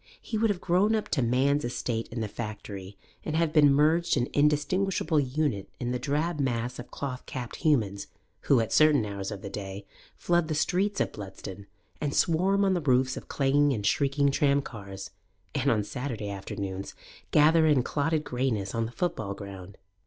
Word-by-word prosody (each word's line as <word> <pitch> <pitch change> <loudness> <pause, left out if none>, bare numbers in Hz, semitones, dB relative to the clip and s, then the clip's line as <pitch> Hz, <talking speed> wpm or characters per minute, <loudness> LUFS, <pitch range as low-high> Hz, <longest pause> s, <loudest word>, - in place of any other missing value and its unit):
He 225 - -6
would 220 +1 +2
have 200 -3 0
grown 190 +6 +2
up 215 - -2
to 135 - +1
man's 135 +5 +2
estate 120 -1 -2
in 115 0 -5
the 110 - -1
factory 100 -3 -7 0.3
and 155 - -3
have 165 -1 +1
been 145 -3 +6
merged 155 +4 +3
an 120 -1 0
indistinguishable 155 +3 +2
unit 135 -6 -1
in 120 -1 -2
the 125 - -1
drab 150 +5 -1
mass 125 -2 -1
of 120 - -8
cloth 130 -2 -5
capped 125 -2 -6
humans 110 - +1 0.4
who, 135 - +5
at 115 - -1
certain 150 -7 +5
hours 100 -1 -4
of 100 -3 -7
the 100 - -5
day, 100 0 -6 0.3
flood 175 -2 +1
the 155 - -1
streets 195 +6 +1
of - - 0
Bludston, 100 -1 -9 0.3
and 145 -2 -1
swarm 190 +4 +3
on 190 - +3
the 175 - 0
roofs 130 -2 +2
of - - -8
clanging 145 +1 +2
and 105 -4 -3
shrieking 140 +3 +2
tramcars, 110 -10 -1 0.4
and 140 -1 +1
on 110 -2 +2
Saturday 115 -3 -4
afternoons 95 0 -5 0.3
gather 160 +2 +5
in 145 -5 +4
clotted 155 +3 0
greyness 120 -8 -1
on 115 -1 0
the - - -9
football 110 - -2
ground. 100 -1 -9
135 Hz, 180 wpm, -28 LUFS, 105-155 Hz, 0.4 s, been